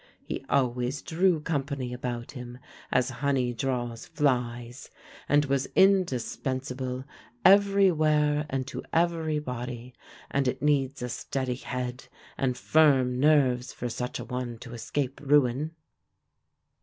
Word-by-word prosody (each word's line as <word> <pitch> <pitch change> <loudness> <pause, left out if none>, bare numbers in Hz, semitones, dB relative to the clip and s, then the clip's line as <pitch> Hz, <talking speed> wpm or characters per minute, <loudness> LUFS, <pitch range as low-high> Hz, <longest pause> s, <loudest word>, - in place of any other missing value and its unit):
He - - -4
always 125 +1 0
drew 170 -1 +2
company 140 -5 -2
about 120 -1 -4
him, 125 -2 -8 0.3
as 130 +1 +2
honey 135 -4 +1
draws 120 -2 -3
flies, 120 -2 -1 0.4
and 145 0 +4
was 135 -1 0
indispensable 130 -7 +1 0.4
every 200 0 +6
where 150 -2 +2
and 135 -1 -2
to 140 - -6
every 165 -2 +1
body; 125 -3 -5 0.4
and 140 -1 +1
it 125 - -1
needs 140 -2 +1
a 125 - -3
steady 130 +1 -2
head 125 0 -5 0.3
and 130 -2 -1
firm 135 -5 +3
nerves 130 -4 +3
for 120 - -4
such 125 +2 -4
a - - -6
one 125 -2 -4
to 120 -2 -9
escape 135 +4 -3
ruin. 145 +2 +2
130 Hz, 125 wpm, -28 LUFS, 125-150 Hz, 0.4 s, every